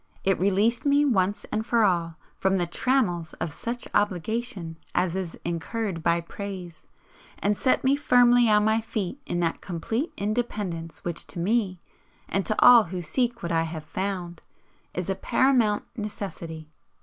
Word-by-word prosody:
It 195 0 +2
released 200 +5 +2
me 285 0 +4
once 205 -6 +1
and 220 - 0
for 230 0 +2
all 170 -4 +1 0.2
from 190 0 +2
the 175 - +1
trammels 175 -4 0
of 155 - -4
such 240 +8 -4
obligation 205 -3 -1 0.2
as 180 -1 +1
is 185 -3 -4
incurred 175 +2 -3
by 170 +1 +2
praise, 180 -2 -8 0.5
and 205 +1 +1
set 255 - +2
me 270 +1 +4
firmly 245 -3 +5
on 210 0 +4
my 220 +1 +3
feet 220 +3 -4
in 175 - -1
that 165 -1 -1
complete 220 - -3
independence 200 -6 -3
which 170 -1 -4
to - - -8
me 190 0 0 0.5
(and 195 0 -1
to 215 - 0
all 245 -2 +9
who 180 +1 -5
seek 240 - -1
what 170 - -2
I 165 -1 +2
have 160 -1 -4
found) 175 0 -4 0.5
is 180 -1 -2
a 195 - +1
paramount 225 +1 +2
necessity. 190 -7 -6
195 Hz, 160 wpm, -26 LUFS, 170-230 Hz, 0.5 s, all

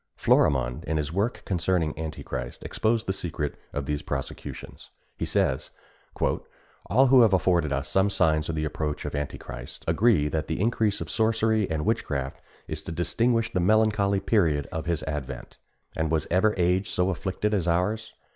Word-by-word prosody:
Florimond, - - +2
in 80 - -1
his 75 +1 -2
work 100 +6 -1
concerning 85 -3 0
Antichrist, 75 -6 -5
exposed 115 +1 0
the 95 - 0
secret 80 -5 -3 0.2
of 70 -1 -3
these 75 +1 -2
prosecutions. - - -6 0.3
He - - -3
says: 65 -1 0 0.5
"All 125 +9 0
who 130 -1 +8
have 110 -4 +5
afforded 90 -5 +2
us 70 0 -1
some 95 +1 +2
signs 80 -5 +2
of 80 - -1
the 75 0 -1
approach 75 0 -3
of - - -4
Antichrist 65 -3 -6
agree 85 -2 +3
that 75 +1 -2
the 80 - -2
increase 110 -1 +1
of - - -5
sorcery 110 -2 +2
and 80 -1 -1
witchcraft 70 -1 -1 0.3
is 80 -1 -4
to 80 - -7
distinguish 115 +7 +1
the 90 - +1
melancholy 100 0 +3
period 85 -9 +2
of 80 -2 -4
his 85 -3 -1
advent; 75 -4 -6 0.4
and 80 -1 0
was 80 -1 +1
ever 100 +4 +3
age 90 +2 +2
so 90 +1 +1
afflicted 95 +4 -2
as 95 -5 0
ours? 105 +6 0
85 Hz, 165 wpm, -26 LUFS, 75-105 Hz, 0.5 s, who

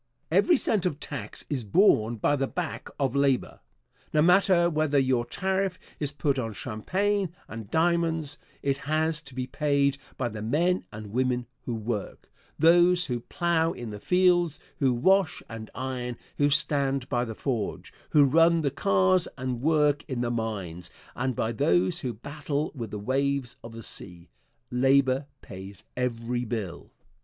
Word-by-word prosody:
Every 345 -4 +5
cent 205 -7 +1
of 150 -4 -4
tax 145 - -5
is 135 -5 -2
borne 115 - +4
by 130 +6 +1
the 135 -1 0
back 180 +2 -4
of 135 -2 0
labor. 140 -2 +1 0.5
No 150 - +3
matter 180 0 +5
whether 155 -3 +1
your 130 -3 +2
tariff 190 -1 -1 0.2
is 145 -2 0
put 145 -2 0
on 115 -3 -3
champagne 185 - -1 0.2
and 115 -3 -8
diamonds, 165 -2 +1 0.2
it 140 0 0
has 155 +2 0
to 140 -5 -10
be 130 -1 -2
paid 140 0 +1 0.2
by 125 - 0
the 110 -2 -6
men 170 - +1
and 105 -1 -8
women 125 0 +1 0.2
who 120 - -2
work 110 -2 -5 0.3
those 175 +3 +5
who 125 -6 -2
plow 165 +5 0
in 120 -3 -7
the 105 - -7
fields, 175 - +3 0.2
who 135 -2 +3
wash 185 +9 +2
and 110 -1 -8
iron, 125 -2 -4 0.2
who 145 0 +3
stand 140 -3 +1
by 120 -1 0
the 115 -2 -5
forge, 120 -6 -3 0.2
who 145 -2 +6
run 165 +4 +4
the 140 -3 0
cars 95 -7 +3
and 130 -2 -3
work 150 -1 +3
in 130 -3 -3
the 120 -1 0
mines, 100 -7 -4 0.3
and 130 0 -1
by 110 - -1
those 90 -4 +2
who 125 - -3
battle 145 +5 -4
with 120 -6 -6
the 105 - -5
waves 135 +3 -1
of 115 - -8
the 115 0 -8
sea. 90 -4 -8 0.4
Labor 135 +2 +3 0.2
pays 95 +1 -10
every 120 -1 -2
bill. 110 -6 -5
135 Hz, 160 wpm, -27 LUFS, 115-155 Hz, 0.5 s, who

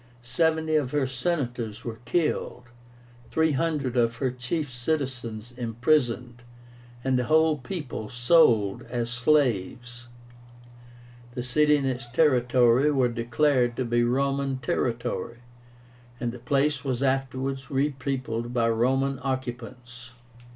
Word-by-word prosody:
Seventy 160 +5 0
of 140 -4 0
her 145 -2 +2
Senators 125 -6 -3
were 115 -2 -5
killed, 125 -6 -1 0.6
three 160 0 +2
hundred 145 -3 -1
of 120 -1 +2
her 130 +2 -1
chief 130 +4 -3
citizens 120 -4 -3
imprisoned, 120 0 0 0.6
and 130 -1 +1
the 125 - -1
whole 155 +1 +3
people 130 - -6
sold 120 -5 +3
as 120 -1 -2
slaves. 120 -2 0 1.3
The 125 - -3
city 150 +4 +3
and 140 - -2
its 125 -2 -3
territory 125 -1 +3
were 130 -4 +2
declared 120 +1 +1
to 130 - -1
be 120 0 +1
Roman 135 +2 0
territory, 120 -1 -2 0.8
and 120 - -2
the 125 - -10
place 140 +3 0
was 130 -2 -2
afterwards 135 0 -1
repeopled 135 -4 -2
by 115 -1 +2
Roman 135 +4 +1
occupants. 125 -2 -6
125 Hz, 115 wpm, -26 LUFS, 120-140 Hz, 1.3 s, whole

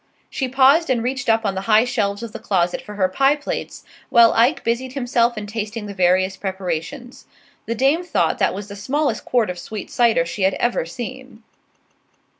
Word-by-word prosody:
She 265 - -2
paused 270 +5 +4
and 240 -3 +1
reached 255 0 -2
up 225 0 +2
on 200 - 0
the 190 - -3
high 215 +2 +5
shelves 200 -3 -2
of 230 - -6
the - - -8
closet 175 -3 0
for 210 - -10
her 190 -2 +2
pie 270 +9 +2
plates, 290 - -6 0.3
while 235 -1 +6
Ike 235 +6 +2
busied 245 +3 -2
himself 245 -3 +1
in 210 - -4
tasting 215 +1 -5
the 205 - -7
various 185 0 +2
preparations. 190 - -5 0.4
The 230 - -2
dame 275 +8 +2
thought 355 - 0
that - - +1
was 200 +1 -6
the 200 - -9
smallest 260 +4 -1
quart 235 -6 +1
of 180 - -8
sweet 215 +1 -7
cider 230 -8 +3
she 180 +4 -6
had 190 0 +2
ever 240 -9 -1
seen. 245 +3 -8
230 Hz, 195 wpm, -21 LUFS, 200-255 Hz, 0.4 s, while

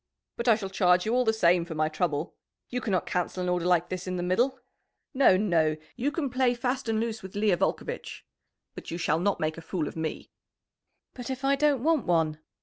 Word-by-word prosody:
"But 235 - -4
I 230 - +7
shall 195 -3 -5
charge 180 -2 +3
you 220 - 0
all 250 0 +2
the 220 - +4
same 180 -5 +3
for 165 -1 -7
my 155 0 +1
trouble. 155 -1 -2 0.4
You 250 0 -2
cannot 190 -6 0
cancel 180 +1 -2
an 180 - -1
order 180 -1 0
like 175 -1 +2
this 185 0 -5
in 185 - -2
the 175 - -2
middle! 245 +9 +1 0.5
No, 260 -9 +5
no! 165 -6 +2 0.2
You 270 +4 -1
can 285 -4 -2
play 250 -1 +2
fast 250 0 -2
and 220 -1 +1
loose 225 -1 -3
with 190 -1 -10
Leah 205 -3 +2
Volcovitch. - - -3 0.5
But - - -9
you 170 - -4
shall 160 -2 +1
not 200 +2 0
make 155 +1 -2
a - - -9
fool 165 -2 -3
of - - -7
me." 160 -1 -4 0.8
"But 245 -1 -7
if 265 +1 -4
I 275 +1 +4
don't 285 -3 +2
want 315 -6 +2
one?" 160 -3 +1
190 Hz, 225 wpm, -27 LUFS, 175-245 Hz, 0.8 s, I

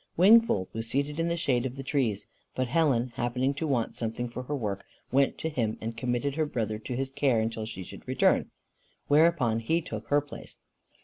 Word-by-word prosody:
Wingfold 195 - +5
was 115 0 -3
seated 140 +4 -1
in 165 - +1
the 170 0 0
shade 125 -7 +1
of 130 -1 -4
the 135 - -6
trees, 120 -8 0 0.3
but 130 - 0
Helen, 130 -4 +2
happening 125 +3 0
to 155 +3 -3
want 125 -6 0
something 115 +1 -3
for 120 - -6
her 145 +4 -3
work, 105 -7 -3 0.3
went 135 +1 +3
to - - -3
him 120 -8 -1
and 115 +1 -5
committed 125 +3 -1
her 155 - +2
brother 110 -5 -2
to 120 +3 -5
his 135 +1 -2
care 135 -4 +2
until 110 0 -2
she 95 -4 -6
should - - -12
return, - - +2 0.6
whereupon 145 -7 +4
he 160 +9 +1
took 110 -9 -7
her 145 - +4
place. 145 0 -10
130 Hz, 200 wpm, -28 LUFS, 115-145 Hz, 0.6 s, Wingfold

